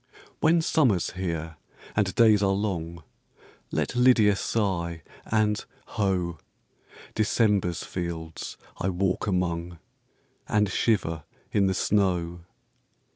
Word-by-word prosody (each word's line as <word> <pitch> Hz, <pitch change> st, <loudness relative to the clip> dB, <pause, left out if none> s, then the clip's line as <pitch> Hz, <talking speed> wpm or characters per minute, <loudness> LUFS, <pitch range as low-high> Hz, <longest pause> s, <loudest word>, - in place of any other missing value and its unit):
When 165 Hz, +1 st, +4 dB
Summer's 125 Hz, -, +2 dB
here 80 Hz, -4 st, -4 dB, 0.4 s
and 100 Hz, -2 st, +1 dB
days 110 Hz, -4 st, +5 dB
are 95 Hz, -1 st, +3 dB
long, 85 Hz, -5 st, -3 dB, 0.7 s
Let -, -, -2 dB
LYDIA 120 Hz, -5 st, +5 dB
sigh 85 Hz, -6 st, -1 dB, 0.2 s
and, 105 Hz, -1 st, +1 dB, 0.3 s
ho! 90 Hz, -5 st, -1 dB, 0.7 s
December's 105 Hz, -5 st, +1 dB
fields 85 Hz, -2 st, -5 dB, 0.2 s
I 95 Hz, -, 0 dB
walk 95 Hz, +1 st, -1 dB
among, 90 Hz, -2 st, -1 dB, 0.7 s
And 105 Hz, -1 st, +2 dB
shiver 85 Hz, -9 st, 0 dB, 0.3 s
in 100 Hz, -2 st, +3 dB
the 95 Hz, -, 0 dB
snow. 85 Hz, -5 st, 0 dB
95 Hz, 100 wpm, -26 LUFS, 85-105 Hz, 0.7 s, days